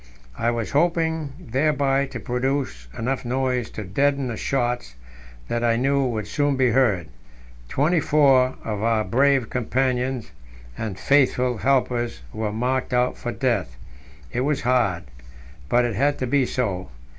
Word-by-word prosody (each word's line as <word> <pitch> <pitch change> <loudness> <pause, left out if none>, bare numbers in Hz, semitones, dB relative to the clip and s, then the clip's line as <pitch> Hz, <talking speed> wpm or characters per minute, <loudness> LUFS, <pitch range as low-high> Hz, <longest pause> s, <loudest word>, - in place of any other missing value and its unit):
I 115 - 0
was 115 -2 -2
hoping 160 -1 +1
thereby 140 -2 +1
to 125 -3 -7
produce 125 - -2
enough 130 +4 -2
noise 125 -1 -1
to 110 - -6
deaden 135 +7 0
the 115 - -3
shots 120 - -2 0.5
that 120 0 -1
I 115 -1 +3
knew 135 +3 +2
would 115 -5 -2
soon 145 +6 0
be 130 -2 +3
heard 110 -9 +2 0.6
twenty 160 +5 +2
four 135 -4 +4
of 105 -2 -3
our 115 -1 +2
brave 130 +3 +2
companions 125 - -1 0.4
and 105 - -4
faithful 125 +2 +2
helpers 120 - 0
were 110 -1 -2
marked 125 +3 -1
out 125 0 +2
for 120 - -4
death. 115 - -1 0.6
It - - -1
was 145 +1 0
hard 120 -9 +1 0.7
but 120 +6 +3
it 120 - -1
had 140 +7 +1
to 130 - -2
be 130 0 +2
so. 95 - -2
125 Hz, 145 wpm, -23 LUFS, 115-135 Hz, 0.7 s, four